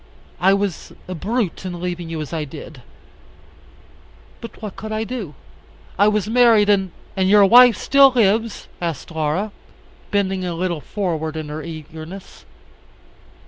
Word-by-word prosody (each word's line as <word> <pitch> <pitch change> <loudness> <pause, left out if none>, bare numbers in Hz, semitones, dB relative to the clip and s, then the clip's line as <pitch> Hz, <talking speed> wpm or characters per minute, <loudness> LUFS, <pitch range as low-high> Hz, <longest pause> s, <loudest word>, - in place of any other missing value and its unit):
I 190 +3 +4
was 200 -3 -3
a 185 - -5
brute 205 +2 -2
in 180 -2 -5
leaving 175 -1 -4
you 165 -1 -4
as 150 - -7
I 160 -2 -2
did. 150 -1 -10 1.6
But 230 - -10
what 210 -3 -7
could 215 +1 -7
I 215 0 -1
do? 220 - -6 0.6
I 205 - +6
was 210 -1 +1
married, 225 -3 +4
and 195 -2 +3
" - - -28
"And 190 0 +1
your 205 0 +7
wife 245 +3 +7
still 275 0 +5
lives?" 225 -2 +1
asked 165 -3 -4
Laura, 160 +6 -1 0.6
bending 195 -2 0
a 175 -2 -3
little 170 -2 -2
forward 160 -6 -3
in 155 -1 -5
her 150 +1 -5
eagerness. 160 +3 -10
190 Hz, 150 wpm, -20 LUFS, 165-215 Hz, 1.6 s, your